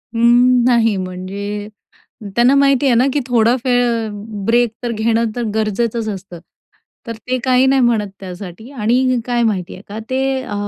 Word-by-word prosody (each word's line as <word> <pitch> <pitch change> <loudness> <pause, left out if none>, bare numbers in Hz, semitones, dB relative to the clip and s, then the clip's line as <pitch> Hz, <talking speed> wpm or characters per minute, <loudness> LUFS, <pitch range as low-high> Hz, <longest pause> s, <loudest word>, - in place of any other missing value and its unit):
उम्म, 240 +1 +4
नाही, 230 -3 +3
म्हणजे 195 +3 -5 0.7
त्यांना 245 +3 +5
माहिती 275 -1 +3
आहे 255 - +4
ना, 245 +3 +3
की 290 - 0
थोडा 235 -1 +3
फ - - -7 0.8
ब्रेक 240 0 +3
तर 240 - -2
घेणं, 225 +1 +1
तर 240 - -2
गरजेचंच 220 +1 -1
असतं, 190 -4 -7 0.7
तर 230 -1 -5
ते 255 0 0
काही 255 0 +3
नाही 270 0 +3
म्हणत 225 -4 +1
त्यासाठी. 185 +4 -9
आणि 250 0 +1
काय 240 -1 0
माहिती 200 -6 -1
आहे 185 - -12
का, 205 +2 -7
ते 265 0 0
अ, 230 - -6
235 Hz, 165 wpm, -17 LUFS, 210-250 Hz, 0.8 s, त्यांना